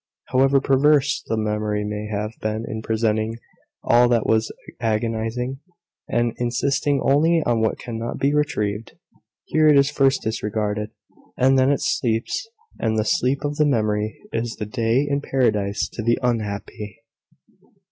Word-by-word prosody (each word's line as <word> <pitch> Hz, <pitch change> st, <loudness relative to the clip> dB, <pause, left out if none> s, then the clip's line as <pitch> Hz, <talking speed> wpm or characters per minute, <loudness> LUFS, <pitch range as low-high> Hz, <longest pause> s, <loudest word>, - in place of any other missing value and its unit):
However 135 Hz, +2 st, +4 dB
perverse 145 Hz, +2 st, +3 dB
the 110 Hz, -, -1 dB
memory 105 Hz, -1 st, -1 dB
may 105 Hz, 0 st, -4 dB
have 105 Hz, 0 st, -3 dB
been 110 Hz, +1 st, -2 dB
in 110 Hz, -, -4 dB
presenting 110 Hz, 0 st, 0 dB, 0.5 s
all 120 Hz, +1 st, +4 dB
that 115 Hz, -2 st, +2 dB
was 110 Hz, 0 st, +1 dB, 0.3 s
agonising, 115 Hz, +3 st, -2 dB, 0.5 s
and 120 Hz, -1 st, +1 dB
insisting 135 Hz, +4 st, 0 dB
only 160 Hz, +4 st, +3 dB
on 120 Hz, -2 st, +1 dB
what 110 Hz, -, +1 dB
cannot 115 Hz, 0 st, -5 dB
be 140 Hz, +1 st, +1 dB
retrieved, 110 Hz, -8 st, -1 dB, 0.5 s
here 155 Hz, 0 st, +3 dB
it 150 Hz, -2 st, +6 dB
is 140 Hz, +1 st, +4 dB
first 135 Hz, -2 st, +2 dB
disregarded, 105 Hz, -1 st, -2 dB, 0.5 s
and 135 Hz, +1 st, +4 dB
then 130 Hz, +1 st, +4 dB
it 140 Hz, -, 0 dB
sleeps 120 Hz, -, -1 dB, 0.3 s
and 110 Hz, -1 st, 0 dB
the 110 Hz, -, +1 dB
sleep 130 Hz, +5 st, +1 dB
of 145 Hz, 0 st, -3 dB
the 150 Hz, -, +4 dB
memory 110 Hz, -4 st, 0 dB
is 115 Hz, 0 st, -2 dB
the 105 Hz, -, -5 dB
day 115 Hz, +4 st, +1 dB
in 140 Hz, 0 st, 0 dB
Paradise 105 Hz, -8 st, 0 dB
to -, -, -6 dB
the 115 Hz, +1 st, +2 dB
unhappy. 105 Hz, -3 st, -3 dB
115 Hz, 145 wpm, -22 LUFS, 110-135 Hz, 0.5 s, it